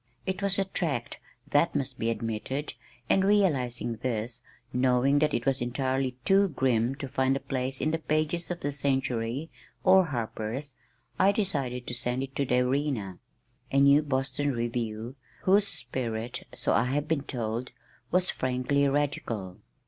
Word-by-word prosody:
It 190 +1 -2
was 200 -1 +1
a 195 - +2
tract, 155 -10 -2 0.3
that 145 +3 +3
must 140 -3 -2
be 115 - 0
admitted, 115 +5 -3 0.3
and 190 - +4
realizing 135 - +2
this, 115 -1 -3 0.3
knowing 130 +2 +3
that 150 0 +3
it 115 - -2
was 135 -1 +1
entirely 130 +1 -1
too 195 +1 +5
grim 130 -5 +1
to 135 - -5
find 130 0 +1
a - - -1
place 130 -1 -3
in 155 - +1
the 160 - 0
pages 155 +2 0
of 175 -1 -4
the 145 - -1
Century 135 0 -1 0.3
or 190 0 +6
Harper's 120 +1 -4 0.4
I 190 +2 +6
decided 140 - -1
to - - -5
send 125 +2 -1
it 135 0 -8
to 140 - +1
the 125 0 +3
Arena, 125 -8 -1 0.5
a 135 - +3
new 140 +1 +6
Boston 140 0 0
review 115 +1 -3 0.3
whose 200 +2 +4
spirit, 120 - -3
so - - 0
I 115 - +3
had 145 +4 -1
been 160 -3 +1
told, 120 -2 -3 0.4
was 180 +1 +3
frankly 130 +2 +1
radical. 130 -10 -2
135 Hz, 155 wpm, -28 LUFS, 120-150 Hz, 0.5 s, or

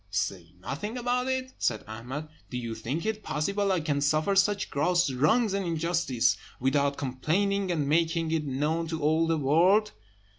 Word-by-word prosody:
"Say 95 -4 -3
nothing 160 - -5
about 250 +1 0
it!" 260 0 -2
said 110 -3 0
Ahmed. 125 +8 -6 0.2
"Do 125 - -4
you 115 -2 -4
think 125 - -4
it 220 -1 -2
possible 200 +6 -1
I 185 -3 +1
can 145 -2 -1
suffer 155 +7 +2
such 200 +1 +2
gross 175 +2 +2
wrong 190 - +2
and 200 0 0
injustice 165 -7 +1 0.2
without 140 +2 +1
complaining, 180 +9 0
and 150 -5 0
making 165 +1 +1
it 160 -1 0
known 150 +5 -1
to 160 0 -3
all 160 +2 +2
the 165 0 +1
world?" 175 +9 +3
160 Hz, 170 wpm, -28 LUFS, 140-195 Hz, 0.2 s, world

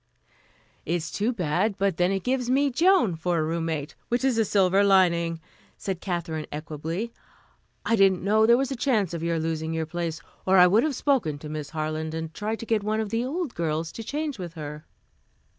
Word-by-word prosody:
"It 170 - -1
is 165 -1 -3
too 215 +4 0
bad; 190 0 0
but 195 -4 0
then 180 +1 +2
it 195 -1 -1
gives 250 -1 0
me 275 +2 +3
Joan 330 - +3
for 175 +2 -1
a 155 - +1
roommate, 160 -2 -2 0.2
which 240 +2 0
is 250 -4 +2
a 225 - +3
silver 195 0 +3
lining," 170 -4 +3 0.4
said 190 -3 -4
Katherine 170 -4 -3
equably. 160 +8 -4 0.7
"I 230 - +3
didn't 195 -4 +4
know 215 +2 +4
there 235 +1 +6
was 270 +1 -1
a - - -1
chance 220 - +1
of 170 - -4
your 170 0 0
losing 160 0 -2
your 160 0 -1
place, 165 0 -3 0.2
or 190 0 +4
I 180 - +9
would 200 +5 +5
have 295 0 0
spoken 240 - +1
to 150 +1 -9
Miss 150 -1 -5
Harland 155 0 -3
and 160 0 -5
tried 215 +2 -3
to - - -5
get 220 -2 +1
one 215 +1 0
of 220 -2 -2
the 230 +1 0
old 300 +2 -3
girls 160 0 -2
to 225 - -7
change 290 0 -3
with 175 -2 -6
her." 150 -1 -7
185 Hz, 210 wpm, -26 LUFS, 160-225 Hz, 0.7 s, I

